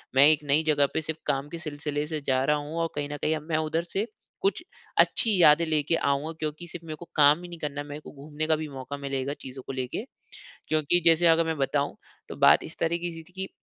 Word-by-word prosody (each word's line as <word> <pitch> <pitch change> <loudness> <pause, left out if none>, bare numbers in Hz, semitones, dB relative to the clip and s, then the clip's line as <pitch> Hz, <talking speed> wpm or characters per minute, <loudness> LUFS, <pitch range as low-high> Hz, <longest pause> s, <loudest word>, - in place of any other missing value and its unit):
मैं 135 - +8
एक 155 -1 +3
नई 145 +2 +2
जगह 145 -2 +4
पे 160 - 0
सिर्फ़ 160 0 -5
काम 140 +2 -1
के 170 - -6
सिलसिले 150 -2 -3
से 155 -2 -3
जा 130 -1 +1
रहा 150 - +3
हूँ 150 +3 -6
और 165 - 0
कहीं 145 0 -3
न 145 - -4
कहीं 155 +1 +1
अब 155 - -5
मैं 155 - +1
उधर 160 +2 -1
से 210 +4 0 0.3
कुछ 200 - 0 0.4
अच्छी 205 -6 +4
यादें 155 +2 +6
लेके 155 0 +1
आऊँगा। 140 +1 0
क्योंकि 155 +3 -4
सिर्फ़ 170 0 -8
मेरे 155 -1 -5
को 175 - -11
काम 150 +2 +5
ही - - -7
नहीं 170 -1 -9
करना, 145 -1 -4
मेरे 145 +1 -8
को - - -11
घूमने 150 +2 -5
का 160 - +4
भी 155 0 -4
मौक़ा 135 +1 -7
मिलेगा 140 0 -3
चीज़ों 130 0 -8
को 135 - -4
लेके। 130 - -3 0.7
क्योंकि 155 +3 +2
जैसे 165 +1 +5
अगर 165 0 +5
मैं 160 -1 -1
बताऊँ, 140 +1 0 0.3
तो - - -7
बात - - +5
इस - - -6
तरह 165 +1 +1
की 175 0 -4
सी 165 0 -8
थी 185 - -20
की 190 +1 -5
155 Hz, 250 wpm, -27 LUFS, 145-165 Hz, 0.7 s, मैं